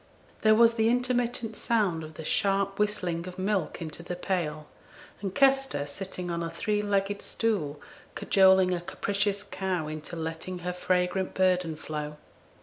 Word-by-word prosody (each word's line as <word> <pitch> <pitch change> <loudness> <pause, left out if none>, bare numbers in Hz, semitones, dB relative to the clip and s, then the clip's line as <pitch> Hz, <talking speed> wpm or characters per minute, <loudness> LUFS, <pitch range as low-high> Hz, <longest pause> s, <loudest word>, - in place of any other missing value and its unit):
There 215 0 +6
was 230 +1 +6
the 225 -1 +2
intermittent 245 -2 0
sound 200 -10 +1
of 155 0 -10
the 160 - -7
sharp 195 +1 +1
whistling 185 -5 0
of 180 0 -8
milk 185 -4 -1
into 155 0 -6
the 180 +1 -5
pail, 170 -5 -2 0.6
and 195 -2 -4
Kester, 270 - +3
sitting 180 +3 -5
on 170 0 -2
a 165 - -2
three 210 +4 -1
legged 200 0 0
stool, 170 -11 -1 0.4
cajoling 190 -1 +5
a 175 - -2
capricious 200 +2 -1
cow 185 -6 -2
into 155 +2 -6
letting 165 +3 -4
her 180 - -1
fragrant 180 +1 0
burden 180 -3 +2
flow. 150 -1 -5
185 Hz, 150 wpm, -28 LUFS, 165-210 Hz, 0.6 s, There